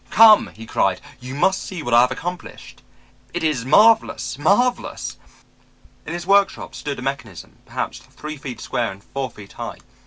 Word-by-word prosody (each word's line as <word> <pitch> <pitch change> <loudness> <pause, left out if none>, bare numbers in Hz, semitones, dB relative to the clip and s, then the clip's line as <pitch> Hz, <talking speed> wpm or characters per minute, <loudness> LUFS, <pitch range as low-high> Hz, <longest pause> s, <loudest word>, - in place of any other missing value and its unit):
"'Come,' 220 -1 +7
he 115 +1 -10
cried; 95 -3 +1 0.2
'you 125 +1 -7
must 190 +6 +2
see 180 -5 -6
what 120 - -2
I 120 - +8
have 125 +1 +3
accomplished. 175 +6 -7 0.5
It - - -2
is 145 -7 0
marvelous, 215 - +4
marvelous.' 240 +11 +1 0.9
"In 160 - -4
his 175 0 -5
workshop 200 0 +2
stood 145 -1 -5
a 125 - -7
mechanism 115 - -6
perhaps - - -4
three 150 0 -9
feet 130 -5 -7
square 120 0 -2
and 100 +1 -13
four 135 -1 -4
feet 100 -2 -13
high. - - -6
140 Hz, 165 wpm, -21 LUFS, 120-185 Hz, 0.9 s, I